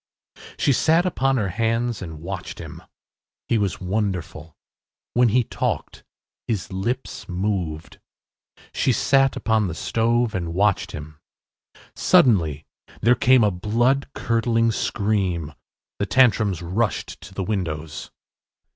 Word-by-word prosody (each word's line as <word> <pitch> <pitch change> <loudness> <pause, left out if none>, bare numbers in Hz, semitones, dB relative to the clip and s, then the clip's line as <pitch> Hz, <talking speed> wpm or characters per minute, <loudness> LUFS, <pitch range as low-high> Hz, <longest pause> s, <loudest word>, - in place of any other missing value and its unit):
She 140 - +3
sat 165 +7 +3
upon 135 -6 +1
her 105 -5 0
hands 115 +3 -1
and 80 -4 -7
watched 95 0 -6
him. - - -9 0.7
He 115 - +2
was 100 -3 -1
wonderful. 90 -5 -3 0.6
When 120 -1 +4
he 125 +3 +3
talked - - -3 0.4
his 100 -4 -3
lips 100 0 -4
moved. 90 -4 -3 0.7
She 130 - +2
sat 135 +2 +3
upon 110 -3 +1
the 85 - -5
stove 115 +2 +1
and 85 -3 -3
watched 100 +1 +1
him. 75 +1 -9 0.8
Suddenly 80 - +3 0.4
there 120 +3 +5
came 130 -1 +4
a 105 - +3
blood 120 +9 +1
curdling 115 0 +1
scream. 95 -8 -1 0.5
The 100 - -1
Tantrums 105 -6 +3
rushed 100 +6 -2
to 95 - -12
the 95 - -2
windows. 80 -6 -4
105 Hz, 120 wpm, -23 LUFS, 90-120 Hz, 0.8 s, there